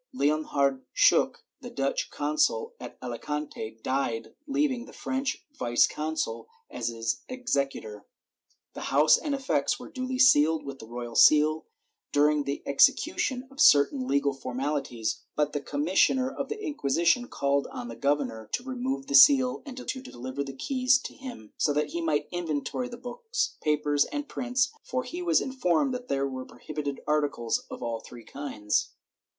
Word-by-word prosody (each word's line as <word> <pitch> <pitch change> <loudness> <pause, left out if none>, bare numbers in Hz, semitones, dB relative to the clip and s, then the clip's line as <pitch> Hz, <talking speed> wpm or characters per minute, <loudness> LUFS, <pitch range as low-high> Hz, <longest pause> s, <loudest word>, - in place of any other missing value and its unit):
Leon 155 - +1
hardt 140 -2 +1
Schuck, - - +4 0.2
the - - -8
Dutch 135 0 -1
consul 450 - 0
at - - -9
Alicante, 125 -2 -5
died, 130 -4 -2
leaving 275 -4 0
the - - -14
French 270 +1 -3
vice 120 - +3
consul 150 -7 -3 0.2
as 120 -2 -3
his 115 +3 -2
executor. 140 - -3 0.7
The - - -7
house 150 +3 +6
and 290 -2 -2
effects 270 0 0
were - - -10
duly 255 -1 -3
sealed 160 - +5
with 140 -1 -7
the 110 - -10
royal 120 0 -6
seal 155 +4 +5 0.4
during 150 0 +3
the 140 0 -3
execution 260 - +2
of 275 +3 -4
certain 255 - +5
legal 140 0 +2
formaUties, 130 -3 -3 0.2
but 150 0 0
the 145 - -2
commissioner 185 - +2
of 275 - -5
the 435 0 -4
Inquisition 245 - +1
called 140 - 0
on - - -7
the 115 - -7
governor 130 -6 -1
to 245 - -1
remove 260 +1 -3
the 285 - -5
seal 270 -3 +7
and 260 -2 -8
deliver 140 - -5
the 135 - -6
keys 255 - +3
to 260 - -8
him, 250 - -10
so 150 - +2
that 150 +1 0
he 170 - -3
might 150 -2 0
inventory 175 - -3
the 240 - -8
books, 465 - -3
papers 150 -1 +2
and 290 0 -5
prints, 250 0 0
for 255 0 -3
he 340 +8 -6
was 345 -2 +3
informed 260 - +1
that 250 0 -5
there 140 0 0
were 130 -1 -5
prohibited 145 0 -6
articles 145 -6 0
of - - -7
all 115 -1 -2
three 120 +1 -12
kinds. 110 -8 -2
150 Hz, 160 wpm, -28 LUFS, -, 0.7 s, seal